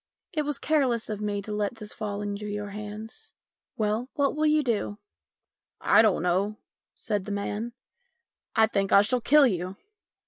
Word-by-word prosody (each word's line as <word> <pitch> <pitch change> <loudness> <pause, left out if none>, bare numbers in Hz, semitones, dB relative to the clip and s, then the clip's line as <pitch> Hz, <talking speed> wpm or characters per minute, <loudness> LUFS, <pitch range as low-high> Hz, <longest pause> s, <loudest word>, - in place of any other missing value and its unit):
It 310 - +1
was 295 -1 -1
careless 260 -8 +1
of 210 -1 -4
me 205 -1 -2
to 210 - -7
let 210 +2 -1
this 215 -2 -8
fall 205 -1 -4
into 205 0 -4
your 205 0 -4
hands. 215 - -7 0.4
Well, 220 +4 0
what 285 -2 +1
will 305 0 +2
you 305 0 +4
do? 215 -4 -1 0.3
" - - -65
" - - -66 0.2
I - - +10
don't 210 -6 +3
know," 190 +4 +1 0.4
said 205 -3 -2
the 210 - -5
man. 205 +3 -3 0.4
" 470 - -56
I 220 - +6
think 200 -2 -1
I 200 - +7
shall 245 +4 +1
kill 290 +4 +6
you." 185 -4 -1
210 Hz, 185 wpm, -27 LUFS, 205-245 Hz, 0.4 s, I